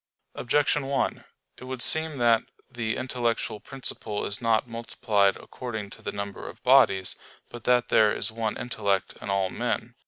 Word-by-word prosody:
Objection 145 +2 +1
1: 135 -1 -1 0.3
It 125 - -10
would 130 -1 -3
seem 160 -2 +2
that 115 -2 +4 0.3
the 115 -3 -2
intellectual 120 -4 -1
principle 110 -3 -3
is 105 - -2
not 115 -1 +2
multiplied 115 -3 +1
according 110 -5 -6
to - - -13
the - - -4
number 100 -1 -6
of - - -13
bodies, 125 -9 +5 0.3
but 120 -2 -10
that 125 0 +3
there 105 -1 +5
is - - -1
one 110 -1 -2
intellect 100 -5 -1
in - - -6
all 95 -1 +1
men. - - -2
115 Hz, 160 wpm, -27 LUFS, 105-125 Hz, 0.3 s, bodies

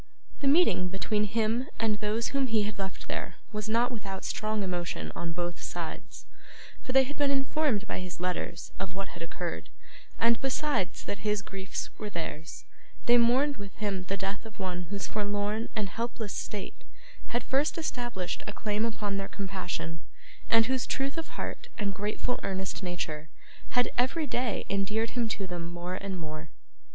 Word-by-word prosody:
The 280 - +1
meeting 280 - +6
between 210 +3 +1
him 225 +5 +2
and 215 -1 +2
those 215 +2 +1
whom 275 -1 +2
he 220 -3 +4
had 205 -1 -3
left 190 -1 -4
there - - -2 0.2
was 210 0 -2
not 235 +3 +4
without 195 -5 -4
strong 215 -1 0
emotion 170 - -1
on 170 -1 -2
both 175 +1 -2
sides; - - -5 0.6
for - - -3
they 265 +1 +8
had 285 +3 -5
been 285 -1 +4
informed 270 -5 +3
by - - -1
his 185 -1 -5
letters 180 -1 -1
of 185 -1 -3
what 195 0 -2
had 170 - -9
occurred: 170 - -3 0.5
and, 230 0 +5
besides 270 -6 +1
that 205 - -2
his 210 0 +1
griefs 195 0 -4
were 210 - -2
theirs, 160 -3 -4 0.4
they 240 - +8
mourned 260 +5 +5
with 200 -2 -7
him 200 -3 -1
the 195 +1 -1
death 195 +1 -2
of 220 -2 -10
one 180 -2 -1
whose 200 -1 -1
forlorn 205 +1 0
and 210 -3 +1
helpless 225 0 -2
state 205 -3 -4 0.4
had 240 0 0
first 280 +5 +2
established 240 - -1
a - - -2
claim 215 +1 +1
upon 205 -3 0
their 195 0 -1
compassion, 185 -4 -3 0.5
and 225 0 +7
whose 260 +1 +1
truth 275 +1 0
of 325 -1 -3
heart 485 - -3
and 205 -3 0
grateful 210 +5 0
earnest 190 0 -1
nature 160 -4 -2 0.5
had, 245 - +5
every 270 +6 +3
day, 245 -5 0
endeared 210 +3 +1
him 235 -3 +1
to 200 -3 -1
them 175 -2 -3
more 175 +1 -3
and 190 0 -2
more. 155 -1 -5
205 Hz, 175 wpm, -31 LUFS, 185-235 Hz, 0.6 s, they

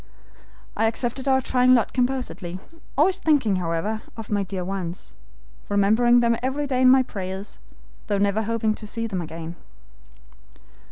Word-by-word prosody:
I 225 - +2
accepted 240 +4 -3
our 265 -1 +4
trying 255 0 +4
lot 235 - +1
composedly, 245 -9 -2 0.4
always 370 +6 +3
thinking, 275 - +2
however, 180 +5 -2 0.2
of 225 -2 -8
my 205 -1 +1
dear 190 -2 -4
ones, 185 -2 -5 0.6
remembering 220 +4 +4
them 235 -1 +2
every 265 +3 -1
day 260 -2 0
in 255 - +7
my 260 0 +6
prayers, 190 -2 -6 0.5
though 205 -2 +1
never 200 +2 +1
hoping 225 0 0
to 215 0 -9
see 230 +2 -3
them 195 -5 -3
again. 165 +1 -7
220 Hz, 150 wpm, -24 LUFS, 195-255 Hz, 0.6 s, in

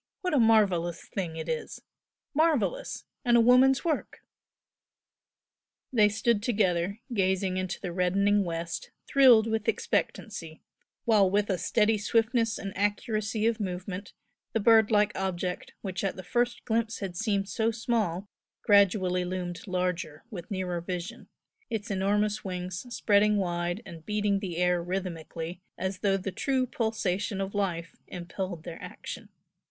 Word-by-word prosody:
What 365 -3 -1
a 285 - +4
marvellous 200 -7 +3
thing 175 -5 -4
it 160 0 -5
is! 160 -1 -4 0.5
Marvellous! 320 - +1 0.2
and 240 -2 +4
a - - +6
woman's 255 +4 +5
work!" 315 -4 -2 1.7
They 210 -3 +5
stood 220 +1 +1
together, 200 -3 +1
gazing 190 -2 +1
into 185 -1 -3
the 180 - -4
reddening 200 +3 +2
west, 170 -1 -4 0.2
thrilled 250 -5 +7
with 220 -2 -2
expectancy, 165 -7 -2 0.4
while 210 -4 +5
with 205 +1 +1
a 185 - -1
steady 215 +4 +2
swiftness 225 +1 +1
and 195 -1 -6
accuracy 215 +1 -1
of 230 0 +1
movement 185 0 -5 0.4
the 225 - +2
bird 220 0 +5
like 210 -1 +3
object 185 -1 -3
which 185 -2 -4
at 195 - -1
the 185 - -8
first 240 +5 -1
glimpse 225 -1 0
had 190 -3 -5
seemed 200 0 0
so 220 +2 0
small 220 -5 -1 0.4
gradually 190 -3 +4
loomed 180 +1 -4
larger 180 -4 -2
with 175 -5 -7
nearer 185 -3 -2
vision, 180 0 -5 0.4
its 215 -2 -3
enormous 205 +2 +1
wings 180 +2 -5
spreading 210 -2 +3
wide 175 +2 -1
and 165 -4 -11
beating 210 -1 +1
the 180 -4 -5
air 180 0 +2
rhythmically 175 -1 -5 0.2
as 190 0 -3
though 195 -1 +2
the 195 +1 -4
true 260 +6 0
pulsation 210 -4 -1
of 195 0 -3
life 175 -5 -2
impelled 180 -1 -5
their 165 -1 -8
action. - - -8
195 Hz, 140 wpm, -28 LUFS, 180-220 Hz, 1.7 s, thrilled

